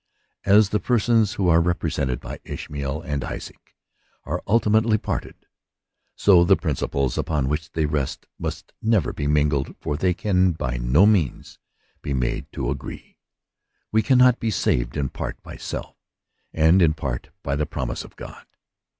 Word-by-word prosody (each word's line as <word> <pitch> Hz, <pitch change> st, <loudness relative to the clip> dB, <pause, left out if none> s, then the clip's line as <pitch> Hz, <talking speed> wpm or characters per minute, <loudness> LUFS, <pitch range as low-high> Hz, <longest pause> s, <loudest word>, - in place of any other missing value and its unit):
As 100 Hz, 0 st, +5 dB
the 105 Hz, -, +1 dB
persons 115 Hz, -3 st, +2 dB
who 95 Hz, -, 0 dB
are 85 Hz, -1 st, +5 dB
represented 75 Hz, -7 st, -1 dB
by -, -, -8 dB
Ishmaet^ 75 Hz, +3 st, -5 dB
and 70 Hz, -5 st, -2 dB
Isaac -, -, -8 dB, 0.5 s
are -, -, -3 dB
ultimately 110 Hz, 0 st, +3 dB
parted, -, -, -4 dB, 0.8 s
so 90 Hz, -4 st, +5 dB
the 95 Hz, +2 st, +5 dB
principl< 70 Hz, -4 st, -1 dB
upon 75 Hz, -5 st, 0 dB
which 75 Hz, +3 st, -3 dB
they 80 Hz, -1 st, +1 dB
rest 75 Hz, -3 st, -2 dB
must -, -, -5 dB
never 110 Hz, -6 st, +1 dB
be 70 Hz, -, -3 dB
mingled, 75 Hz, -2 st, +1 dB
for 75 Hz, -, -2 dB
they 90 Hz, +2 st, +1 dB
can 95 Hz, -4 st, +2 dB
by 65 Hz, -5 st, -3 dB
no 60 Hz, +10 st, +4 dB
means 95 Hz, -, +1 dB, 0.4 s
be 70 Hz, -, -2 dB
made 60 Hz, -2 st, -2 dB
to -, -, -2 dB
agree. -, -, -8 dB, 0.7 s
We 110 Hz, -, +3 dB
cannot 125 Hz, 0 st, +5 dB
be 115 Hz, -, -1 dB
saved 60 Hz, -, 0 dB
in 70 Hz, -3 st, -1 dB
part -, -, -6 dB
by -, -, -10 dB
self, -, -, -6 dB, 0.6 s
and 80 Hz, +4 st, +4 dB
in 80 Hz, -3 st, +4 dB
part 65 Hz, -6 st, -4 dB
by 70 Hz, -, -1 dB
the 75 Hz, +1 st, -1 dB
promise 65 Hz, -5 st, -4 dB
of -, -, -15 dB
God. -, -, -11 dB
80 Hz, 160 wpm, -23 LUFS, 70-105 Hz, 0.8 s, As